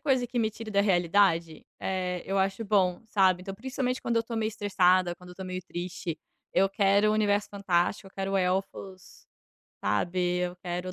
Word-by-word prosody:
coisa 260 Hz, -4 st, +1 dB
que 245 Hz, 0 st, -3 dB
me 220 Hz, -1 st, +1 dB
tire 220 Hz, 0 st, -8 dB
da 200 Hz, -1 st, +3 dB
realidade, 175 Hz, -3 st, +2 dB
eh, 180 Hz, -2 st, -2 dB
eu 195 Hz, 0 st, -1 dB
acho 195 Hz, +4 st, 0 dB
bom, 190 Hz, -3 st, +2 dB
sabe. 190 Hz, -4 st, +3 dB
Então, 195 Hz, +1 st, -6 dB
principalmente, 255 Hz, +2 st, -3 dB
quando 235 Hz, -, -1 dB
eu 230 Hz, -, +3 dB
tô 230 Hz, 0 st, -6 dB
meio 220 Hz, -1 st, 0 dB
estressada, 185 Hz, -4 st, +2 dB
quando 180 Hz, 0 st, -14 dB
eu -, -, -11 dB
tô 190 Hz, -, -7 dB
meio 185 Hz, 0 st, -4 dB
triste, 175 Hz, -2 st, -5 dB, 0.3 s
eu 195 Hz, +1 st, +3 dB
quero 200 Hz, +1 st, +3 dB
um -, -, +2 dB
universo 205 Hz, -1 st, +1 dB
fantástico, 195 Hz, -1 st, 0 dB
eu -, -, -13 dB
quero 195 Hz, 0 st, -2 dB
elfos, 190 Hz, 0 st, -3 dB, 0.6 s
sabe, 180 Hz, 0 st, 0 dB
eu 180 Hz, 0 st, -2 dB
quero 180 Hz, 0 st, -4 dB
195 Hz, 185 wpm, -28 LUFS, 180-210 Hz, 0.6 s, da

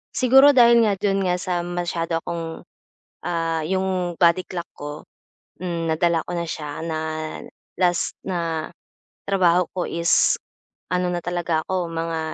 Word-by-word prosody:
Siguro 270 Hz, +3 st, +7 dB
dahil 235 Hz, -2 st, +6 dB
nga 205 Hz, -2 st, +2 dB
do'n 195 Hz, -1 st, +1 dB
nga 180 Hz, -1 st, +2 dB
sa 180 Hz, -2 st, -1 dB
masyado 175 Hz, -1 st, -2 dB
akong, 165 Hz, -1 st, -5 dB, 0.6 s
ah, 165 Hz, -1 st, -1 dB
'yong 185 Hz, -1 st, -1 dB
body 175 Hz, +1 st, +5 dB
clock 175 Hz, -2 st, -5 dB
ko 145 Hz, +1 st, -7 dB, 0.6 s
hmm, 170 Hz, -2 st, -2 dB
nadala 170 Hz, 0 st, +2 dB
ko -, -, -3 dB
na 170 Hz, -, -1 dB
siya 150 Hz, -2 st, -5 dB
na 160 Hz, -1 st, -2 dB, 0.8 s
last 175 Hz, -1 st, +2 dB
na 165 Hz, -4 st, -2 dB, 0.6 s
trabaho 180 Hz, -3 st, +3 dB
ko 180 Hz, -, -1 dB
is, 170 Hz, 0 st, +3 dB, 0.6 s
ano 180 Hz, 0 st, +1 dB
na 175 Hz, -, -2 dB
talaga 175 Hz, -2 st, -1 dB
ako 185 Hz, -2 st, -1 dB
mga 165 Hz, 0 st, -2 dB
175 Hz, 140 wpm, -23 LUFS, 165-185 Hz, 0.8 s, Siguro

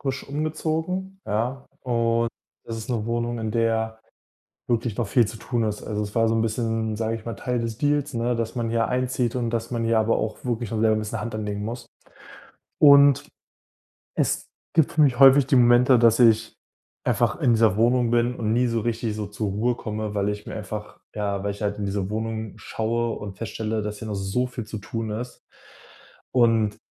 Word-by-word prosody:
frisch 135 Hz, -1 st, -3 dB
umgezogen, 160 Hz, +6 st, -2 dB
ja, 120 Hz, +6 st, -2 dB
und 115 Hz, -2 st, +1 dB, 0.4 s
das 115 Hz, -, -5 dB
ist 110 Hz, +2 st, -6 dB
'ne 115 Hz, -2 st, -1 dB
Wohnung, 120 Hz, 0 st, -1 dB
in 110 Hz, -1 st, -3 dB
der 110 Hz, -1 st, 0 dB, 0.7 s
wirklich 115 Hz, -2 st, 0 dB
noch 120 Hz, -, -1 dB
viel 120 Hz, +2 st, +4 dB
zu 110 Hz, -, -7 dB
tun 120 Hz, 0 st, -2 dB
ist. 105 Hz, -1 st, -3 dB
Also, 105 Hz, 0 st, -3 dB
es 105 Hz, -, -8 dB
war 115 Hz, -1 st, +3 dB
so -, -, +2 dB
'n 115 Hz, -, +2 dB
bisschen, 115 Hz, -1 st, -1 dB
sage 110 Hz, +1 st, -1 dB
ich 110 Hz, -, -15 dB
mal, 115 Hz, -, -3 dB
Teil 125 Hz, -2 st, -2 dB
des 115 Hz, -2 st, -3 dB
Deals, 145 Hz, +1 st, 0 dB
ne, 120 Hz, +1 st, 0 dB
dass 115 Hz, 0 st, -3 dB
man 115 Hz, -2 st, -1 dB
hier 115 Hz, 0 st, +1 dB
einzieht 125 Hz, -1 st, -1 dB
und 120 Hz, -2 st, -1 dB
dass 115 Hz, 0 st, -2 dB
man 115 Hz, -1 st, -1 dB
hier 115 Hz, 0 st, +3 dB
aber 110 Hz, +1 st, +2 dB
auch 110 Hz, 0 st, -2 dB
wirklich 120 Hz, -3 st, -2 dB
noch 110 Hz, -, -1 dB
selber 110 Hz, 0 st, +3 dB
'n -, -, 0 dB
bisschen 110 Hz, +1 st, -5 dB
eine -, -, -5 dB
Hand 115 Hz, -1 st, -4 dB
anlegen 105 Hz, -1 st, -3 dB
muss. 120 Hz, +2 st, -6 dB, 0.9 s
Und 140 Hz, -2 st, +7 dB, 0.9 s
es -, -, 0 dB, 0.3 s
gibt 160 Hz, -, +3 dB
für 160 Hz, -, +1 dB
mich 135 Hz, -4 st, +3 dB
häufig 135 Hz, 0 st, +8 dB
die 135 Hz, -1 st, +3 dB
Momente, 120 Hz, +1 st, +6 dB
dass 115 Hz, 0 st, +4 dB
ich 115 Hz, -2 st, +4 dB, 0.5 s
einfach -, -, +1 dB
in 120 Hz, -, +4 dB
dieser 110 Hz, -3 st, +3 dB
Wohnung 120 Hz, +1 st, +3 dB
bin 120 Hz, +1 st, +2 dB
und 110 Hz, -1 st, -1 dB
nie 125 Hz, +2 st, +3 dB
so 115 Hz, -1 st, 0 dB
richtig 115 Hz, -1 st, -2 dB
so 105 Hz, -1 st, -3 dB
zur 105 Hz, +1 st, -3 dB
Ruhe 115 Hz, +5 st, 0 dB
komme, 110 Hz, -2 st, -4 dB
weil 100 Hz, -1 st, 0 dB
ich 105 Hz, 0 st, -4 dB
mir -, -, -6 dB
einfach 105 Hz, 0 st, -7 dB, 0.2 s
ja, 100 Hz, -2 st, -2 dB
weil 100 Hz, 0 st, -1 dB
ich 100 Hz, -, -9 dB
halt 105 Hz, 0 st, -1 dB
in 100 Hz, -, -2 dB
diese 100 Hz, -1 st, -2 dB
Wohnung 110 Hz, 0 st, -3 dB
schaue 115 Hz, +1 st, -2 dB
und 100 Hz, -2 st, -8 dB
feststelle, 110 Hz, 0 st, -3 dB
dass 105 Hz, 0 st, -5 dB
hier 110 Hz, -, -7 dB
noch 105 Hz, -, -3 dB
so 95 Hz, +6 st, -1 dB
viel 125 Hz, -2 st, -6 dB
zu 110 Hz, +1 st, -7 dB
tun 110 Hz, +2 st, -4 dB
ist. 120 Hz, +4 st, -6 dB, 0.9 s
Und 115 Hz, -4 st, +3 dB
115 Hz, 210 wpm, -24 LUFS, 110-120 Hz, 0.9 s, häufig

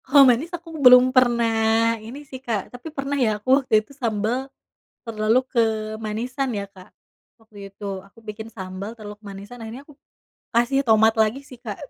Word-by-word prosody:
Kalo 275 Hz, +1 st, +6 dB
manis, 255 Hz, +6 st, +3 dB
aku 340 Hz, -1 st, -8 dB
belum 250 Hz, 0 st, +8 dB
pernah 230 Hz, -2 st, +3 dB
ini 260 Hz, +7 st, -9 dB
sih, 260 Hz, -2 st, -10 dB
Kak. 225 Hz, -6 st, -3 dB
Tapi 245 Hz, +6 st, -8 dB
pernah 275 Hz, -2 st, -4 dB
ya 215 Hz, -3 st, +2 dB
aku 260 Hz, +7 st, +3 dB
waktu 215 Hz, -5 st, +2 dB
itu 280 Hz, -, -17 dB
sambal, 240 Hz, 0 st, -2 dB, 0.5 s
terlalu 225 Hz, +2 st, +1 dB
kemanisan 220 Hz, +3 st, -1 dB
ya 200 Hz, -1 st, -3 dB
Kak, 185 Hz, -2 st, -15 dB, 0.5 s
waktu 205 Hz, -3 st, -12 dB
itu. 195 Hz, -1 st, -6 dB
Aku 225 Hz, +3 st, -21 dB
bikin 220 Hz, 0 st, -7 dB
sambal, 195 Hz, 0 st, -7 dB
terlalu 210 Hz, -2 st, -10 dB
kemanisan. 205 Hz, +3 st, -10 dB
Akhirnya 225 Hz, +4 st, -8 dB
aku 295 Hz, -, -17 dB, 0.6 s
kasih 245 Hz, +4 st, +2 dB
tomat 220 Hz, -3 st, +4 dB
lagi 220 Hz, +3 st, +1 dB
sih, 255 Hz, -, -13 dB
Kak. 210 Hz, -5 st, -6 dB
225 Hz, 165 wpm, -23 LUFS, 215-255 Hz, 0.6 s, belum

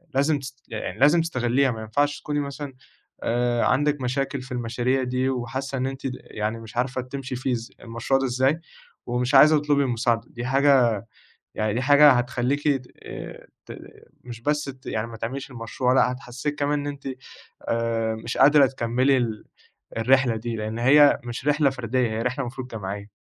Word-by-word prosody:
لازم 140 Hz, +2 st, +2 dB
تس 130 Hz, 0 st, -10 dB
يعني -, -, -5 dB
لازم 150 Hz, +5 st, +5 dB
تستغليها، 130 Hz, -4 st, +1 dB
ما 110 Hz, -2 st, -6 dB
ينفعش 145 Hz, +7 st, 0 dB
تكوني 145 Hz, 0 st, -2 dB
مثلًا 140 Hz, 0 st, -5 dB, 0.5 s
آآ 120 Hz, 0 st, +1 dB
عندِك 145 Hz, +1 st, +1 dB
مشاكل 135 Hz, +2 st, -2 dB
في 130 Hz, +1 st, -12 dB
المشاريع 125 Hz, +2 st, -1 dB
دي، 125 Hz, +1 st, 0 dB
وحاسة 135 Hz, +2 st, -3 dB
إن 130 Hz, -, -1 dB
أنتِ 135 Hz, 0 st, -6 dB
يعني 110 Hz, 0 st, -4 dB
مش 115 Hz, 0 st, -11 dB
عارفة 130 Hz, +1 st, 0 dB
تمشي 130 Hz, +1 st, -6 dB
فيه 130 Hz, +1 st, -2 dB
إز 115 Hz, -1 st, -5 dB
المشروع 120 Hz, +4 st, -1 dB
ده 135 Hz, -, -1 dB
إزاي، 130 Hz, +5 st, +1 dB, 0.5 s
ومش 125 Hz, +3 st, 0 dB
عايزة 150 Hz, +3 st, +7 dB
تطلبي 145 Hz, -1 st, +2 dB
المساعدة 120 Hz, -2 st, 0 dB
دي 120 Hz, -6 st, -7 dB
حاجة، 130 Hz, -5 st, +3 dB, 0.5 s
يعني 110 Hz, -1 st, 0 dB
دي 125 Hz, -, 0 dB
حاجة 145 Hz, +1 st, +7 dB
هتخليكِ 125 Hz, +4 st, 0 dB
ت 135 Hz, -3 st, +1 dB, 0.8 s
ت -, -, -9 dB, 0.5 s
مش 120 Hz, -2 st, -9 dB
بس 150 Hz, +3 st, 0 dB
ت 130 Hz, -1 st, -10 dB
يعني 110 Hz, +1 st, -2 dB
ما 115 Hz, -1 st, -9 dB
تعمليش 130 Hz, +5 st, -5 dB
المشروع، 125 Hz, +1 st, -1 dB
لأ 125 Hz, -1 st, +4 dB
هتحسسِك 130 Hz, +3 st, -5 dB
كمان 145 Hz, 0 st, 0 dB
إن 145 Hz, -, -4 dB
أنتِ 140 Hz, -1 st, -6 dB, 0.6 s
آآ 115 Hz, -1 st, 0 dB
مش 110 Hz, +2 st, -5 dB
قادرة 145 Hz, 0 st, +7 dB
تكملي 130 Hz, +2 st, +1 dB
ال 115 Hz, -3 st, -2 dB, 0.5 s
الرحلة 125 Hz, 0 st, +3 dB
دي، 115 Hz, +1 st, -4 dB
لإن 110 Hz, +1 st, -4 dB
هي 145 Hz, +4 st, +6 dB
مش 120 Hz, +3 st, -6 dB
رحلة 145 Hz, -1 st, +3 dB
فردية 125 Hz, -1 st, -1 dB
هي 110 Hz, +1 st, -2 dB
رحلة 125 Hz, +3 st, -2 dB
المفروض 125 Hz, +1 st, -6 dB
جماعية. 100 Hz, -1 st, -6 dB
130 Hz, 175 wpm, -24 LUFS, 120-140 Hz, 0.8 s, عايزة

